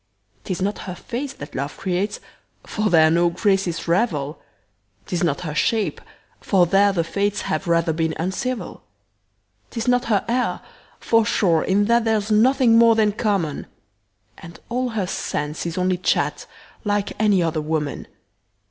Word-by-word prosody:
'Tis 185 Hz, -1 st, -3 dB
not 205 Hz, +2 st, -2 dB
her 180 Hz, -, -5 dB
face 255 Hz, +9 st, -5 dB
that -, -, -10 dB
love 140 Hz, +3 st, -4 dB
creates, 190 Hz, +2 st, -2 dB, 0.5 s
For 215 Hz, -1 st, -1 dB
there 160 Hz, -3 st, +5 dB
no 170 Hz, +1 st, +3 dB
graces 190 Hz, -2 st, 0 dB
revel; 165 Hz, -6 st, 0 dB, 0.6 s
'Tis 180 Hz, -, -2 dB
not 150 Hz, -5 st, 0 dB
her 160 Hz, -4 st, -4 dB
shape, 220 Hz, +7 st, 0 dB, 0.4 s
for 185 Hz, -3 st, +3 dB
there 195 Hz, +3 st, +4 dB
the 175 Hz, -4 st, 0 dB
fates 200 Hz, +4 st, -1 dB
Have 165 Hz, +4 st, -3 dB
rather 170 Hz, -1 st, +2 dB
been 160 Hz, 0 st, -1 dB
uncivil. 190 Hz, +5 st, -3 dB, 0.9 s
'Tis 230 Hz, 0 st, -4 dB
not 245 Hz, 0 st, +2 dB
her 210 Hz, -4 st, +1 dB
air, 250 Hz, +2 st, 0 dB, 0.4 s
for 225 Hz, -1 st, +3 dB
sure 180 Hz, -7 st, +2 dB
in 200 Hz, +2 st, +2 dB
that 235 Hz, +1 st, +3 dB
There's 215 Hz, -1 st, 0 dB
nothing 235 Hz, +1 st, +4 dB
more 230 Hz, -1 st, +6 dB
than 215 Hz, -1 st, +3 dB
common; 200 Hz, -8 st, -1 dB, 0.7 s
And 170 Hz, 0 st, -12 dB
all 250 Hz, +1 st, -1 dB
her 220 Hz, -5 st, -2 dB
sense 150 Hz, -3 st, -3 dB
is 170 Hz, -, -5 dB
only 185 Hz, 0 st, +1 dB
chat -, -, 0 dB, 0.4 s
Like 205 Hz, -2 st, -1 dB
any 205 Hz, -4 st, +3 dB
other 160 Hz, -1 st, -1 dB
woman. 150 Hz, -2 st, -3 dB
195 Hz, 155 wpm, -22 LUFS, 170-220 Hz, 0.9 s, more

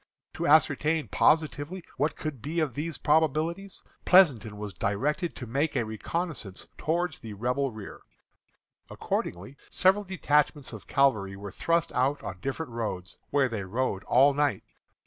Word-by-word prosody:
To -, -, -2 dB
ascertain 155 Hz, +1 st, +3 dB
positively 160 Hz, +3 st, +1 dB
what 145 Hz, +4 st, 0 dB
could 150 Hz, -7 st, -5 dB
be 155 Hz, +6 st, -2 dB
of 155 Hz, -6 st, 0 dB
these 155 Hz, +4 st, -4 dB
probabilities, 160 Hz, +5 st, 0 dB, 0.2 s
Pleasonton 130 Hz, -, +5 dB
was 105 Hz, -1 st, -6 dB
directed 135 Hz, -, -1 dB
to 125 Hz, -, -7 dB
make 140 Hz, +7 st, -1 dB
a 120 Hz, -4 st, +1 dB
reconnoissance 110 Hz, -, -4 dB
toward 175 Hz, +3 st, -1 dB
the 110 Hz, -3 st, -7 dB
Rebel 125 Hz, +6 st, -1 dB
rear. 110 Hz, -3 st, -9 dB, 0.9 s
Accordingly, 100 Hz, +11 st, -4 dB
several 190 Hz, +3 st, +3 dB
detachments 150 Hz, -7 st, 0 dB
of 110 Hz, -, -10 dB
cavalry 110 Hz, -9 st, +2 dB
were 100 Hz, 0 st, -8 dB
thrust 170 Hz, -, 0 dB
out 135 Hz, +3 st, 0 dB
on -, -, -6 dB
different 135 Hz, 0 st, -4 dB
roads, 105 Hz, -6 st, -5 dB
where 140 Hz, -2 st, +3 dB
they 115 Hz, -4 st, -4 dB
rode 100 Hz, 0 st, -2 dB
all 140 Hz, +3 st, +5 dB
night. 145 Hz, -1 st, 0 dB
140 Hz, 145 wpm, -28 LUFS, 115-160 Hz, 0.9 s, Pleasonton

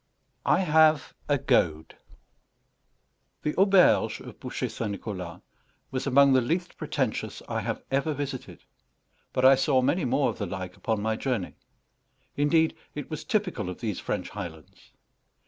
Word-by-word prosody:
I -, -, +4 dB
HAVE 155 Hz, -3 st, +4 dB, 0.2 s
A 145 Hz, -, +4 dB
GOAD 80 Hz, -9 st, +1 dB, 1.5 s
The 150 Hz, -, 0 dB
auberge 195 Hz, -1 st, +4 dB
of -, -, -11 dB
Bouchet -, -, -3 dB
St. 115 Hz, -, -4 dB
Nicholas 95 Hz, -4 st, -6 dB, 0.5 s
was 130 Hz, +2 st, -3 dB
among 140 Hz, +1 st, +6 dB
the 130 Hz, -, +5 dB
least 170 Hz, +9 st, -2 dB
pretentious 140 Hz, -6 st, -3 dB
I -, -, -2 dB
have -, -, -4 dB
ever 140 Hz, +3 st, +1 dB
visited; 135 Hz, -2 st, -6 dB, 0.7 s
but 130 Hz, -, +1 dB
I 135 Hz, -, +9 dB
saw 135 Hz, -1 st, +2 dB
many 170 Hz, +4 st, +1 dB
more 135 Hz, +3 st, +2 dB
of -, -, -12 dB
the 100 Hz, -, -2 dB
like 90 Hz, -1 st, -6 dB
upon 110 Hz, -2 st, -2 dB
my 110 Hz, 0 st, 0 dB
journey. 120 Hz, -9 st, -2 dB, 0.8 s
Indeed, 160 Hz, +3 st, +3 dB, 0.2 s
it 145 Hz, +1 st, -6 dB
was 155 Hz, -, -4 dB
typical 185 Hz, -, -1 dB
of 90 Hz, -, -7 dB
these 105 Hz, -5 st, -3 dB
French -, -, -3 dB
highlands. 85 Hz, -7 st, -9 dB
130 Hz, 145 wpm, -27 LUFS, 105-150 Hz, 1.5 s, I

